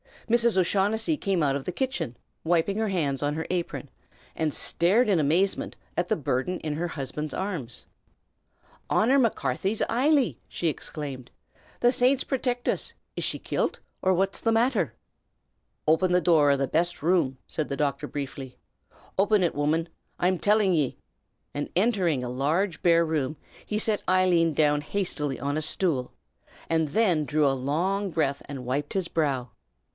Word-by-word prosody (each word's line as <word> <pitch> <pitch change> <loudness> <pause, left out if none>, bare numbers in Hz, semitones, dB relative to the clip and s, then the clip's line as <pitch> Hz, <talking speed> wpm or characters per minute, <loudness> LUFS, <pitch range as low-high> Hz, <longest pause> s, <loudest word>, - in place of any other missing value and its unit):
Mrs. 235 -2 +3
O'Shaughnessy 205 - +2
came 190 - 0
out 140 -1 +2
of 135 - -8
the - - -2
kitchen, 260 - -2 0.3
wiping 175 +4 +2
her 220 0 0
hands 150 -9 -1
on 145 0 0
her 160 - -3
apron, 175 -2 -3 0.4
and 160 -1 -1
stared 200 - +2
in 190 -5 +3
amazement 170 +7 +1 0.2
at 175 - +1
the - - +1
burden 145 +4 -1
in 155 -1 -2
her 170 +3 -2
husband's 150 -1 -4
arms. 175 - -4 1.0
"Honor 260 +6 +4
Macarthy's 220 -3 0
Eily!" 270 +2 +2
she 170 - -1
exclaimed. 140 -5 -6 0.5
"The 245 - +5
Saints 255 +2 +3
protict 250 -2 -2
uz! - - -1 0.2
Is - - -2
she - - -1
kilt, - - -2 0.2
or 185 - +3
what's 195 +2 0
the 225 - +2
matther?" 235 +4 +2 0.9
"Open 175 +4 +3
the 180 - +4
door 155 -5 +4
o' 140 - +4
the 135 0 0
best 170 +3 0
room!" 160 -6 +2
said 155 - -3
the 140 - -4
doctor, 145 -2 -1
briefly. 135 -2 -6 0.6
"Open 205 0 +4
it, 170 - +1
woman, 155 +3 0 0.3
I'm 180 0 +1
tillin' 205 -2 +3
ye!" 150 -6 0 0.6
and 145 - -3
entering 180 - +2
a 125 - -3
large 155 +8 0
bare 170 -1 +4
room, 155 -2 -1 0.3
he 210 - -2
set 215 -1 +2
Eileen 180 -3 +3
down 150 0 +2
hastily 150 -5 -2
on 145 +1 -1
a - - 0
stool, 155 -5 -1 0.6
and 160 -1 +2
then 170 -2 +2
drew 150 +1 +2
a 140 - +4
long 175 +10 -1
breath 145 -5 0
and 135 -3 -7
wiped 140 +4 -2
his 190 -3 0
brow. 135 -7 -1
170 Hz, 160 wpm, -26 LUFS, 145-195 Hz, 1.0 s, The